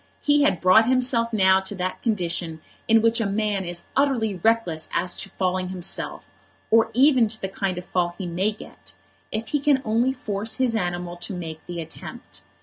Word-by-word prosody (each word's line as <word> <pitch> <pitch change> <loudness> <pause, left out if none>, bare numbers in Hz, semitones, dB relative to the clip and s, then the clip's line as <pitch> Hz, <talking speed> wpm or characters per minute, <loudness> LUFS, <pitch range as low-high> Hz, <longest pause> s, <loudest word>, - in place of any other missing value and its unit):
He 290 0 +3
had 240 - +2
brought 200 +6 +5
himself 250 -2 +2
now 190 -3 +5
to 190 +2 -6
that 185 0 -3
condition 170 -6 -2 0.3
in 225 0 +5
which 230 0 +3
a 215 - 0
man 205 -1 -1
is 175 0 -5
utterly 260 -6 +2
reckless 225 -9 +1
as 180 -1 0
to 195 - -4
falling 185 -1 -1
himself, 185 -1 -4 0.4
or 225 0 +5
even 260 -3 +5
to 220 +1 -2
the 190 - -3
kind 190 -1 -3
of 180 - -6
fall 175 -2 -1
he 190 - -5
may 180 +5 0
get, 210 - -13 0.4
if 220 +1 -3
he 295 - +1
can 280 -1 +3
only 230 +4 +2
force 220 -4 -3
his 255 -3 +1
animal 175 -3 -3
to 185 +2 -5
make 160 -3 -7
the 175 -1 -5
attempt. 160 -1 -9
200 Hz, 190 wpm, -24 LUFS, 180-230 Hz, 0.4 s, brought